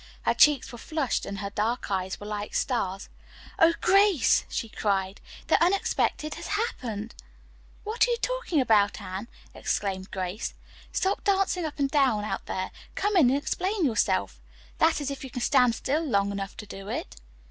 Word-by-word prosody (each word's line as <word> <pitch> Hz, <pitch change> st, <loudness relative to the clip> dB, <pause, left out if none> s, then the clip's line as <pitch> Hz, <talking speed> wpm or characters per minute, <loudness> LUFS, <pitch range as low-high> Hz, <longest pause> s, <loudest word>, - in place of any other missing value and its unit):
Her -, -, +3 dB
cheeks 295 Hz, -3 st, +4 dB
were 240 Hz, -, -9 dB
flushed 305 Hz, -4 st, -1 dB
and 200 Hz, -, -5 dB
her 200 Hz, 0 st, -4 dB
dark 215 Hz, +2 st, -1 dB
eyes 190 Hz, -1 st, -2 dB
were 205 Hz, -, -8 dB
like 210 Hz, 0 st, -5 dB
stars. 195 Hz, -7 st, -1 dB, 0.5 s
"Oh, 330 Hz, 0 st, +6 dB
Grace," 390 Hz, -, +4 dB
she 230 Hz, -, -3 dB
cried. 195 Hz, -3 st, -1 dB, 0.2 s
"The -, -, +3 dB
unexpected 340 Hz, -4 st, +1 dB
has -, -, -7 dB
happened!" 240 Hz, -, -3 dB, 0.7 s
"What 440 Hz, +3 st, +2 dB
are -, -, -3 dB
you 475 Hz, -, +1 dB
talking -, -, -1 dB
about, 215 Hz, -6 st, +3 dB
Anne?" 195 Hz, +2 st, -6 dB, 0.3 s
exclaimed 190 Hz, -1 st, -2 dB
Grace 185 Hz, +3 st, -4 dB
laughing. -, -, -23 dB
"Stop 385 Hz, +1 st, 0 dB
dancing 385 Hz, -3 st, +1 dB
up 310 Hz, -, -5 dB
and 275 Hz, -2 st, 0 dB
down 260 Hz, -8 st, +3 dB
out 215 Hz, -, -4 dB
there. 185 Hz, 0 st, -3 dB, 0.2 s
Come 410 Hz, +1 st, 0 dB
in 305 Hz, -9 st, +6 dB
and 270 Hz, -, +3 dB
explain 365 Hz, +5 st, -1 dB
yourself. 95 Hz, -, 0 dB, 0.4 s
That 320 Hz, -1 st, +3 dB
is 280 Hz, -1 st, -2 dB
if 275 Hz, -, -6 dB
you 265 Hz, -, -6 dB
can 245 Hz, -, -5 dB
stand 250 Hz, -4 st, +4 dB
still 295 Hz, +7 st, -1 dB
long 200 Hz, -9 st, +1 dB
enough 195 Hz, 0 st, -5 dB
to 210 Hz, -, -7 dB
do 195 Hz, -1 st, -9 dB
it." -, -, -5 dB
245 Hz, 180 wpm, -27 LUFS, 200-330 Hz, 0.7 s, Oh